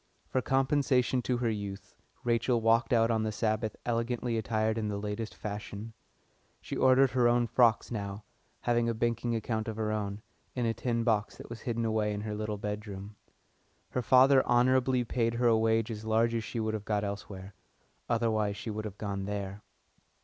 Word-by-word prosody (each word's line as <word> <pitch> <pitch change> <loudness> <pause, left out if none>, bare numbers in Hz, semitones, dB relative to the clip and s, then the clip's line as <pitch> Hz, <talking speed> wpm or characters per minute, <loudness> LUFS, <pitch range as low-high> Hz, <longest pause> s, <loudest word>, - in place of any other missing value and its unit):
For 130 - +1
compensation 135 -1 +2
to 125 0 0
her 120 -1 0
youth 100 -2 -6 0.3
Rachel 120 0 +2
walked 115 +1 +3
out 115 -1 +4
on 110 -1 +1
the 110 0 -1
Sabbath 110 0 -1
elegantly 120 0 -1
attired 110 0 0
in 110 - -2
the 105 -1 -2
latest 105 +2 -4
fashion. 105 +1 -6 0.7
She - - -6
ordered 130 0 +5
her 125 -1 +3
own 120 0 +3
frocks 115 -1 +3
now, 100 -2 -4 0.4
having 120 -1 +1
a 115 - -1
banking 115 +1 0
account 110 0 -2
of 110 - -3
her 110 -1 -1
own, 105 0 -3 0.3
in 125 -2 0
a 115 - +1
tin 115 -1 -1
box 110 -3 0
that - - -11
was 115 - -7
hidden 115 -1 -2
away 110 -1 0
in 105 - -4
her 105 0 -4
little 105 0 -3
bedroom. 105 0 -6 0.8
Her 125 - 0
father 130 +3 +6
honourably 125 +1 +3
paid 115 0 0
her 120 +1 0
a 115 -1 +6
wage 110 0 +2
as 110 -1 -6
large 110 +1 +2
as 115 -1 -1
she 115 - -4
would 110 0 -1
have 110 -2 -3
got 105 -1 -1
elsewhere 100 -1 -6 0.6
otherwise 110 -3 +1
she 115 - -5
would 110 +1 -4
have 105 -2 -6
gone 100 -2 -3
there. 100 0 -4
110 Hz, 185 wpm, -30 LUFS, 105-120 Hz, 0.8 s, father